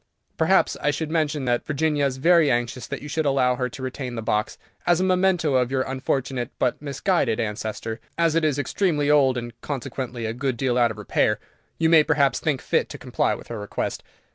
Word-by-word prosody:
Perhaps - - +3
I 150 - +2
should 155 +1 -2
mention 155 -4 0
that 120 -1 +1
Virginia 150 -1 +1
is 130 -1 -4
very 165 +1 +4
anxious 120 +1 -1
that - - -6
you - - -6
should 155 0 -1
allow 130 -2 +3
her 125 0 -1
to 135 -2 -9
retain 130 -1 -4
the 115 - -4
box, 105 0 -1 0.3
as 175 -1 +4
a - - +1
memento 185 -4 +2
of 125 -2 +2
your 130 -1 0
unfortunate 130 -2 -2
but 125 - 0
misguided 145 - 0
ancestor. 110 +1 -3 0.2
As 165 -2 +3
it 165 0 +2
is 150 -3 +1
extremely 150 0 +1
old, 135 -4 +4
and 120 -1 -5
consequently 125 -3 -4
a 110 - -2
good 130 0 -2
deal 125 0 0
out 120 -1 +4
of 110 - -7
repair, 105 - +1 0.4
you 165 - +2
may 160 -1 +7
perhaps 140 -4 +2
think 145 -5 -1
fit - - +1
to - - -7
comply - - 0
with - - -12
her 115 -2 -5
request. 105 - -3
135 Hz, 210 wpm, -24 LUFS, 120-155 Hz, 0.4 s, may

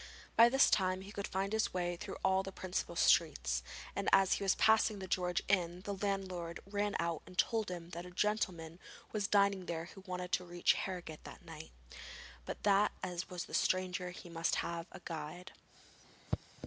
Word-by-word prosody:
By 230 +1 +8
this 270 +2 +5
time 185 -1 +2
he 195 +1 -9
could 200 -1 -4
find 195 +2 -2
his 220 -3 +1
way 175 -1 0
through 170 - -7
all 190 0 +4
the 195 0 -6
principal 185 -2 -3
streets, 60 - +3 0.3
and - - 0
as 195 -1 +6
he - - -1
was 195 - +3
passing 220 -1 +4
the 190 - -5
George 180 0 0
Inn, 180 -2 +1
the 200 +1 -4
landlord 190 -4 -3
ran 205 +1 -1
out 170 -1 -1
and 180 - -13
told 220 -1 +2
him 175 -1 -6
that 175 +1 -6
a - - -9
gentleman 180 -4 -1 0.3
was 205 -2 0
dining 200 -2 +3
there 165 -1 -3
who 195 - -11
wanted 180 0 -4
to 180 - +1
reach 175 0 +2
Harrogate 175 -5 -5
that - - -11
night, 160 -1 -9 0.8
but - - -6
that 205 +1 +4
as 180 -2 -2
he - - -13
was 175 -1 -5
a - - -12
stranger 185 -1 +1
he 180 0 -10
must 165 -1 0
have 170 0 -4
a 190 - -10
guide. 170 +2 -6
185 Hz, 190 wpm, -35 LUFS, 175-195 Hz, 0.8 s, By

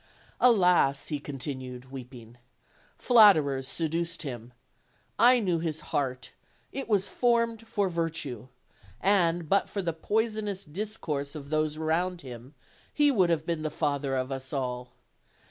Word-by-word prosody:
Alas!" 180 - +4
he 150 -2 -2
continued, 130 -2 -7
weeping, 120 -3 -10 0.6
"flatterers 155 - +5
seduced 165 +2 -1
him. 120 -4 -7 0.7
I 245 +1 +7
knew 180 -6 0
his 160 -2 -3
heart, 130 -2 -2 0.4
it 270 -3 -5
was 200 -3 +2
formed 230 -2 0
for 205 -3 0
virtue; 165 - -3 0.5
and, 175 -3 +2
but 195 +5 +2
for 200 - -3
the 170 -2 -1
poisonous 210 +2 -2
discourse 150 -5 -4
of 140 -1 -9
those 155 0 0
around 170 +3 -1
him, 125 +1 -11 0.4
he 295 -1 +4
would 190 -9 +3
have 160 -2 0
been 165 -2 -2
the 155 - -2
father 145 -3 -1
of 130 +1 -2
us 135 0 -5
all. 125 -3 -3
160 Hz, 135 wpm, -28 LUFS, 135-195 Hz, 0.7 s, I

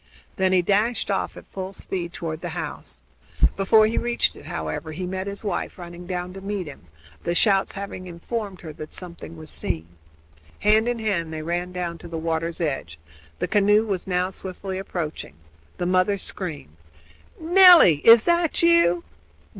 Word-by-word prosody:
Then 190 -1 +2
he 185 -1 +3
dashed 210 +4 +1
off 195 - -2
at - - -11
full 190 0 -5
speed 180 -2 -4
toward 165 -2 -5
the 175 -1 -5
house. 65 - -8 0.5
Before 215 +3 +5
he 220 - 0
reached 240 0 0
it - - -13
however, 80 - -4
he 180 +3 -4
met 190 +1 -4
his 200 +2 -6
wife 200 -4 -3
running 175 0 -9
down 180 0 -4
to 195 - -9
meet 200 -1 -3
him, 140 - -12 0.4
the 170 - -1
shouts 195 +1 +3
having 195 -2 -7
informed 190 +3 -5
her 160 -3 -8
that 155 +1 -9
something 170 -2 -7
was 155 -1 -9
seen. 80 0 -3 0.8
Hand 215 +2 +4
in 245 0 0
hand 195 -8 -1
they 155 -1 -5
ran 175 +2 -2
down 175 -2 -4
to - - -10
the 165 - -5
water's 165 +1 -2
edge. 135 - -3 0.4
The - - -2
canoe 210 +1 +4
was 195 -4 -3
now 180 0 0
swiftly 190 0 -5
approaching. 165 - -5 0.4
The 175 - -2
mother 185 +2 +2
screamed: 155 - -7 0.6
"Nelly! 350 - +8
is 230 +8 +7
that 340 -1 +2
you?" 335 - +4
185 Hz, 170 wpm, -24 LUFS, 170-205 Hz, 0.8 s, Nelly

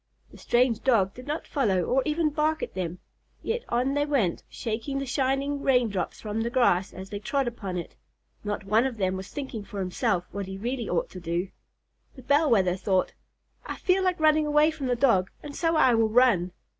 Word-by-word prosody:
The - - -14
strange 240 -2 +2
Dog 200 -7 +3
did 250 +2 -12
not 300 +2 -3
follow 200 - +1
or 260 +9 +2
even 305 0 +1
bark 310 +1 0
at - - -5
them, 180 -2 -4 0.5
yet 470 +2 -2
on 250 +3 +1
they 290 0 +1
went, 235 - +1
shaking 230 +5 -4
the 275 - -2
shining 275 +2 0
rain 250 -4 +3
drops 195 -3 -3
from 215 +1 -3
the 230 - -1
grass 215 -7 +2
as 190 +1 -9
they 205 - -4
trod 270 +5 -1
upon 200 -6 -4
it. 170 - -6 0.5
Not 210 0 -3
one 220 +6 +3
of 250 -4 -6
them 190 -2 0
was 190 +1 -6
thinking 265 -7 -6
for 200 0 -7
himself 185 0 0
what 200 -1 -5
he 190 0 -6
really 235 +2 -3
ought 175 - -1
to 185 - -8
do. 175 +2 -2 0.7
The 260 - -12
Bell 290 +4 +3
Wether 190 -6 +3
thought, 190 0 0 0.5
"I - - -4
feel 375 0 +1
like 365 -2 +1
running 310 -1 +4
away 300 +1 +4
from 300 -4 -5
the 250 - +1
Dog, 230 -8 +3
and 290 -1 -8
so 330 -1 +1
I 260 -5 +5
will 225 -1 +3
run." 215 -7 +3
240 Hz, 210 wpm, -26 LUFS, 195-280 Hz, 0.7 s, I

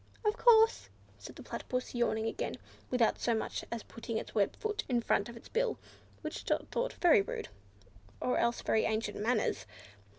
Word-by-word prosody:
"Of 425 +1 +3
course," 455 -2 +5 0.3
said - - -10
the - - -10
Platypus, 250 0 -4
yawning 230 -2 +1
again, 225 - -2 0.3
without 245 -3 +2
so 235 - +1
much 220 - -3
as 235 -2 -3
putting 230 0 -5
its - - -5
web 205 -3 +2
foot 425 0 -2
in 245 -2 +3
front 210 -2 +1
of 235 - -9
its - - -13
bill, 485 -1 0 0.4
which - - -5
Dot - - -1
thought - - -1
very 335 - +5
rude, 195 - -5 0.7
or 250 - +1
else 235 0 +1
very 220 - +2
ancient 220 -1 -1
manners. 215 - 0
235 Hz, 175 wpm, -32 LUFS, -, 0.7 s, course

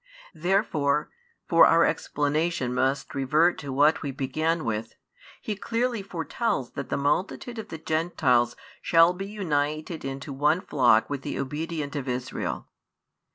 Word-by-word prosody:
Therefore, 160 -4 +1 0.4
for - - +7
our - - +5
explanation 150 -2 0
must 135 +2 0
revert 150 +6 +2
to 140 - -6
what 145 +4 +3
we 145 - -3
began 155 +5 -1
with, 115 0 -3 0.5
He 215 - -2
clearly 235 +2 -1
foretells 170 - -2
that - - -6
the - - 0
multitude 185 - -1
of 215 - -6
the 160 - -7
Gentiles 155 -7 +1 0.3
shall 165 +1 +5
be 195 +2 -6
united 155 -5 -2
into 135 +1 -5
one 150 +6 +2
flock 120 -9 +3
with 140 -2 -4
the - - -4
obedient 150 +2 -4
of 140 -2 -3
Israel. 125 0 -3
150 Hz, 140 wpm, -26 LUFS, 135-170 Hz, 0.5 s, for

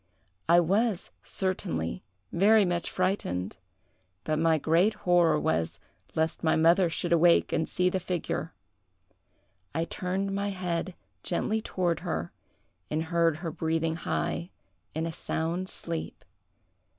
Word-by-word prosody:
I 170 +1 +7
was, 195 +3 +1
certainly, 85 - -2 0.3
very 205 +4 +5
much 175 -1 -1
frightened; 180 - -1 0.7
but 155 0 0
my 165 -1 +4
great 170 +8 +3
horror 175 - +4
was, 80 +2 -1 0.4
lest 160 +2 0
my 160 - +3
mother 170 +3 +4
should 170 +1 -1
awake 170 0 +4
and 160 -1 0
see 180 - +1
the 185 +1 +1
figure. 170 -3 -3 1.2
I 165 - +1
turned 190 +3 -2
my 200 +1 -1
head 180 -2 -3 0.3
gently 220 - -1
toward 175 -5 -1
her, 80 +1 -3 0.6
and 155 +1 0
heard 165 -1 +2
her 165 - -1
breathing 160 +1 -1
high 170 +1 -2 0.5
in 160 +1 -1
a 165 - -3
sound 170 +4 -2
sleep. 165 -1 -5
170 Hz, 125 wpm, -28 LUFS, 160-185 Hz, 1.2 s, I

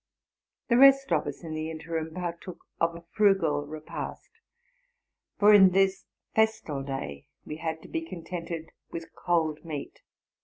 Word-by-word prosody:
The 235 0 +4
rest 275 -3 +7
of 150 -3 +2
us, 145 +4 -6
in 160 -1 -6
the 155 0 -3
interim, 160 0 -4
partook 175 0 -5 0.2
of 165 0 +1
a 170 - -10
frugal 170 -9 +2
repast; 155 - -7 1.1
for 210 +1 +7
in 190 -3 +8
this 190 0 +2 0.3
festal 220 -10 +1
day 135 - -5 0.2
we 150 - -6
had 160 -1 -4
to - - -11
be 330 - -3
contented 170 - -6 0.2
with 165 -1 -7
cold 160 -3 0
meat. 155 -4 -7
165 Hz, 145 wpm, -28 LUFS, 155-190 Hz, 1.1 s, in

